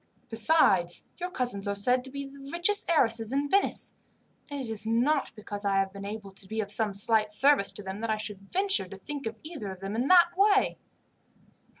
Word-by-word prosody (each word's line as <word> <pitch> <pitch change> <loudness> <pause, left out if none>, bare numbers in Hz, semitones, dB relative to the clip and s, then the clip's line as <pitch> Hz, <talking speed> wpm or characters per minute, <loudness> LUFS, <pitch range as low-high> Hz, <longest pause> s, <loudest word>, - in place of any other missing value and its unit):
Besides, 215 - +3 0.2
your 360 0 -4
cousins 245 - -2
are 200 - -1
said 250 +5 +3
to - - -2
be 280 +1 -6
the 275 0 -12
richest 345 +4 +3
heiresses 230 -8 +2
in 280 +2 -1
Venice; 395 +7 +1 0.6
and 285 -1 -5
it 260 - -5
is 220 -1 +2
not 260 +6 +1
because 205 -1 -8
I 200 -1 0
have 195 0 0
been 200 0 -8
able 205 -1 -7
to 190 0 -12
be 220 +2 -5
of 200 -2 -2
some 210 -2 0
slight 215 +1 +2
service 210 -1 +4
to 205 - -5
them, 195 +2 -7
that 230 - -3
I 215 - 0
should 205 -2 -8
venture 385 - +2
to 195 - -10
think 280 +5 -6
of 225 - -5
either 310 - -7
of 190 -1 -9
them 195 +2 -6
in 245 +4 -1
that 350 0 +6
way." 400 +1 +2
225 Hz, 215 wpm, -27 LUFS, 200-285 Hz, 0.6 s, that